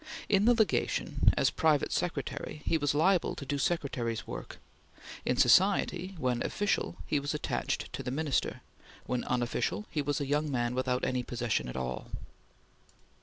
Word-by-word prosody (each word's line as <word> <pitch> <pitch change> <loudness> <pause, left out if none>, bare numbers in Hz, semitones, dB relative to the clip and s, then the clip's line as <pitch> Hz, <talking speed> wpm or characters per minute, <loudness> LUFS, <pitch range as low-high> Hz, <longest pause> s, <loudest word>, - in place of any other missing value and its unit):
In 200 0 +3
the 240 +1 +6
Legation, 220 -3 +2
as - - +3
private 155 -3 +2
secretary, 160 -3 -3
he - - +2
was 145 -1 +1
liable 175 +4 +3
to 140 - -7
do 140 +1 -2
Secretary's 130 -7 -1
work. - - -7 0.7
In 125 - +1
society, 185 - +4
when 125 -5 0
official, 205 -3 0
he 150 - +1
was 145 +2 -3
attached 150 - -2
to - - -4
the - - -4
Minister; 145 +1 -1 0.4
when 125 -1 -1
unofficial, 125 - -1
he 150 - 0
was 145 +1 -1
a 145 - -1
young 150 +2 0
man 120 -3 0
without 125 0 0
any 130 -1 0
position 120 - -1
at 60 - -6
all. 65 -1 -4
140 Hz, 160 wpm, -30 LUFS, 125-165 Hz, 0.7 s, the